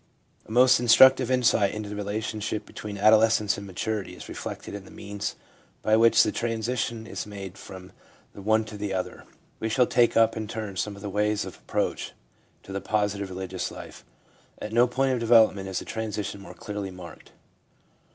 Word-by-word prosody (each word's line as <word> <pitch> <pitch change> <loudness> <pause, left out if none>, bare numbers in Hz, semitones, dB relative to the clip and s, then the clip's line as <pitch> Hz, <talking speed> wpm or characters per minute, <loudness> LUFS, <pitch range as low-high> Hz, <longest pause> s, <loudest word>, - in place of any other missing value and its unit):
A - - -11
most 125 +1 +6
instructive 130 +2 +6
insight 120 -6 +3
into 105 -1 -5
the 105 - -6
relationship 105 +1 -3
be - - -17
tween 105 -1 -6
adolescence 110 0 +4
and 100 - -9
maturity 100 +2 -3
is - - -10
reflected - - -7
in 100 -1 -6
the - - -15
means 100 0 -5 0.5
by 110 - +4
which 115 +1 +6
the - - 0
transition 115 0 -2
is - - -6
made 100 -2 -8
from 95 -2 -11 0.4
the 100 - -10
one 110 +2 +2
to 105 -1 -9
the 100 -2 -3
other. 90 - -4 0.3
We 110 - -2
shall 125 +3 +3
take 120 -1 +3
up 115 -1 +4
in 110 -1 -4
turn 105 -2 -5
some 100 +2 -2
of 100 - -12
the 100 - -4
ways 105 +1 0
of - - -8
approach - - -3 0.5
to 95 - -9
the 100 - -3
positive 100 -1 -1
religious 95 0 -4
life. - - -11 0.6
At 105 - -6
no 120 +2 +5
point 130 +2 +1
of 125 - -1
develop 115 -2 +6
ment 95 -1 -7
is 95 -1 -3
the - - -4
transition 105 -2 -4
more 100 - -11
clearly 105 -2 -5
marked. 90 -2 -12
105 Hz, 190 wpm, -26 LUFS, 100-115 Hz, 0.6 s, most